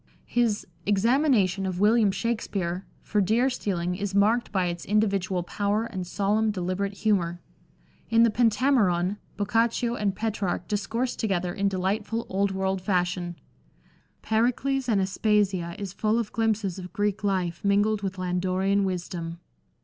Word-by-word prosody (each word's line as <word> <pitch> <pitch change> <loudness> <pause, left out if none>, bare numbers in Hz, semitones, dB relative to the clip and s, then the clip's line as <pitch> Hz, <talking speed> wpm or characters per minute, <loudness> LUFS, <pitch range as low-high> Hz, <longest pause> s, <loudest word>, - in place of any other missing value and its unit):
His 235 -4 0 0.2
Examination 210 - +2
of 180 -1 -3
William 215 +1 +4
Shakspere 195 -3 -2 0.2
for 210 - +1
deer 230 +7 +2
stealing 180 -6 -2
is 195 +1 -3
marked 220 +4 +3
by 190 -3 +1
its 175 -1 -3
individual 195 -4 +1
power 205 +4 -1
and 185 -5 -5
solemn 210 +4 +1
deliberate 195 0 -2
humour; 175 -5 +1 0.7
in 230 0 +5
the 230 - +4
Peiitameron 210 -6 +2 0.2
Boccaccio 230 +3 +1
and 205 -4 -1
Petrarch 195 -5 -2
discourse 225 +5 -1
together 180 -5 -1
in 200 0 0
delightful 205 +4 -1
old 200 +1 +1
world 190 0 -1
fashion; 180 -2 -1 0.9
Pericles 250 +4 +1
and 210 -3 +3
Aspasia 190 -3 +1
is 200 -3 -5
full 215 +2 +1
of 230 -3 -2
glimpses 215 -5 0
of 180 -1 -8
Greek 205 0 -1
life 185 -4 -1
mingled 205 +1 +2
with 195 -1 -4
Landorian 185 +2 0
wisdom. 175 -2 -4
200 Hz, 135 wpm, -26 LUFS, 185-220 Hz, 0.9 s, in